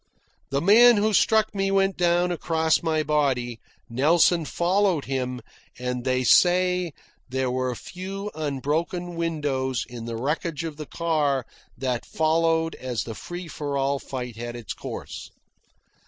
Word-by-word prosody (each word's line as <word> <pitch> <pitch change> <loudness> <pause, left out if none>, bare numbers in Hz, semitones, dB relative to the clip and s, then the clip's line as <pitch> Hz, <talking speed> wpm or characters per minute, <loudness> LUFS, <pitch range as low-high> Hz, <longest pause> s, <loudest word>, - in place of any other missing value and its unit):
The 140 +1 0
man 230 +5 +7
who 215 +1 +2
struck 220 +2 +3
me 195 -1 0
went 195 -1 +2
down 175 0 +2
across 160 -2 +1
my 160 -2 0
body, 135 -6 0 0.3
Nelson 160 +6 +3
followed 180 -1 +1
him, 125 -2 -3 0.4
and 125 0 -3
they 130 0 +1
say 180 +4 +4 0.4
there 130 0 -1
were 130 -1 -1
few 195 - -6
unbroken 155 +4 -2
windows 145 -7 -1
in 120 -1 -8
the 115 -1 -4
wreckage 150 +5 -2
of 160 -3 -5
the 150 -2 -7
car 150 -6 0 0.3
that 125 -3 -2
followed 165 +1 +1
as 125 -3 -3
the 115 - -6
free 175 +9 -7
for 145 -3 -4
all 140 0 0
fight 125 -4 -6
had 120 +1 -5
its 120 -4 -6
course. - - -7
155 Hz, 140 wpm, -25 LUFS, 130-175 Hz, 0.4 s, man